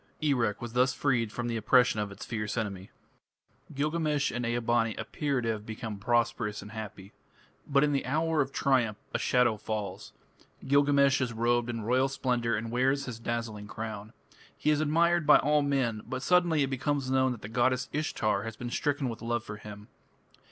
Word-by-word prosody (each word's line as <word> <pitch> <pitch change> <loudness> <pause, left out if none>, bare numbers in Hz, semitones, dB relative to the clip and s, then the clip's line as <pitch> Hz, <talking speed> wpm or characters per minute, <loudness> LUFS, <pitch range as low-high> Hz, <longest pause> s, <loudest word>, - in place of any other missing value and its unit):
Erech 120 -9 0
was 120 -1 -6
thus 130 +1 +2
freed 120 -6 +1
from 120 +2 -3
the 115 -1 -1
oppression 125 -1 +4
of 105 -1 -2
its 100 - -9
fierce 105 -1 -3
enemy. 100 -4 -4 0.9
Gilgamesh 150 0 0
and 120 - -3
Ea 120 +1 0
bani 115 -1 +1
appear 140 -4 -2
to 115 - -2
have 110 -2 -2
become 110 -1 -6
prosperous 115 -1 0
and 105 - -11
happy. 105 -3 -8 0.5
But 140 0 +3
in 150 - +2
the 140 -2 -1
hour 160 +2 +1
of 135 -1 -2
triumph 120 -8 +1 0.2
a - - 0
shadow 125 -3 +2
falls. 105 -1 -5 0.6
Gilgamesh 140 -1 +4
is 125 -2 -1
robed 120 +1 +1
in 115 -2 -3
royal 130 +4 +2
splendour 125 -3 0
and 115 +2 -4
wears 130 +3 +1
his 115 -3 -6
dazzling 115 -3 -4
crown. 110 -1 -6 0.5
He 150 - +2
is 150 0 +2
admired 170 +1 +2
by 150 - +9
all 150 +1 +2
men, 130 -6 0
but 130 0 -4
suddenly 175 -4 +3
it 135 - -2
becomes 135 0 -1
known 130 0 +3
that 115 - -11
the - - -5
goddess 125 +3 +1
Ishtar 110 -9 0
has 115 +1 -6
been 120 +2 -6
stricken 145 -1 0
with 115 -3 -5
love 120 -1 -1
for 105 -2 -7
him. 105 0 -10
120 Hz, 185 wpm, -29 LUFS, 110-140 Hz, 0.9 s, by